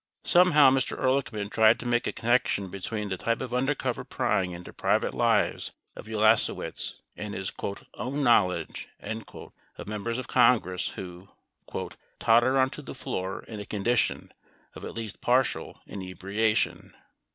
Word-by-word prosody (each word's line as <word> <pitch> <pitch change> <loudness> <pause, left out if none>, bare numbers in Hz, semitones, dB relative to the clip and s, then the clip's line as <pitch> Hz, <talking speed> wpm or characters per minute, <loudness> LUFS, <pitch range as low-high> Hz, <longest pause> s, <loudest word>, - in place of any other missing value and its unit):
25 - - -1
Somehow 165 -7 +7
Mr. 130 0 0
Ehrlichman 125 -6 0
tried 110 +1 +5
to - - -7
make 120 0 +1
a - - 0
connection 115 -5 +1
between 105 +2 -4
the 95 - -2
type 115 +5 -1
of 125 -2 -5
undercover 135 +3 0
prying 95 -1 0
into 90 0 -9
private - - +1
lives - - +1 0.2
of - - -10
Hlasewicz 110 0 +2 0.2
and 105 -1 -6
his 95 0 -4 0.4
"own 135 +4 -3
knowledge" 105 -8 +2
of 110 -2 -9
Members 110 +3 -3
of 130 - -5
Congress 95 -7 +3
who 90 +1 -8 0.9
"totter 120 +4 +4
onto 130 +2 +1
the 135 - -9
floor 95 -7 -4
in 110 -2 -8
a 105 - -6
condition 115 +3 0 0.4
of - - -10
at - - -7
least 115 -3 -6
partial 125 +1 +1
inebriation." 100 +3 -1
110 Hz, 140 wpm, -27 LUFS, 100-125 Hz, 0.9 s, Somehow